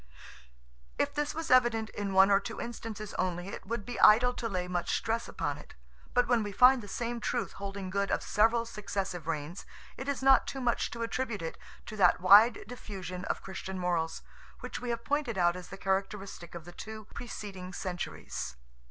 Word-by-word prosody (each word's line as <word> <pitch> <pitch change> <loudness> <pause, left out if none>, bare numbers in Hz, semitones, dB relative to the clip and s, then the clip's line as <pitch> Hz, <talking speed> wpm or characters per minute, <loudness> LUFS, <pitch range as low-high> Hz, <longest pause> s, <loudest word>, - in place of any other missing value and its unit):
If - - +1
this 295 0 -2
was 325 -1 -3
evident 235 -3 +4
in 200 -1 -3
one 190 +1 +7
or 195 - +6
two 200 - -7
instances 220 -3 -6
only, 180 +1 -1
it - - -8
would 220 -2 -3
be 245 - -5
idle 245 +4 +7
to 230 -2 -3
lay 180 -3 -2
much 175 -1 0
stress 230 +1 -2
upon - - -3
it; - - -14 0.4
but 245 - +4
when 240 -2 +3
we 205 -1 -3
find 250 +5 +6
the 205 - -10
same 235 +3 -3
truth - - -1
holding 195 -1 -6
good 200 0 0
of - - 0
several 230 +2 +3
successive 195 -6 -4
reigns, 160 +2 -3 0.3
it 265 - -6
is 275 -2 -2
not 270 0 +6
too 270 - -4
much 245 -2 0
to 235 -1 -4
attribute 230 -5 -2
it 160 - -4 0.3
to 215 - -7
that 180 -3 +5
wide 205 +5 +7
diffusion 190 -6 -7
of - - -2
Christian 190 0 -6
morals, 175 -3 -1 0.4
which - - -5
we 250 - -4
have 235 0 -3
pointed 280 -7 0
out 175 -1 +3
as 180 -1 -8
the 195 - -9
characteristic 195 -2 -3
of 170 -2 -8
the 175 - -9
two 215 +4 -8
preceding 195 -6 -7
centuries. 180 - -5
205 Hz, 195 wpm, -31 LUFS, 185-235 Hz, 0.4 s, one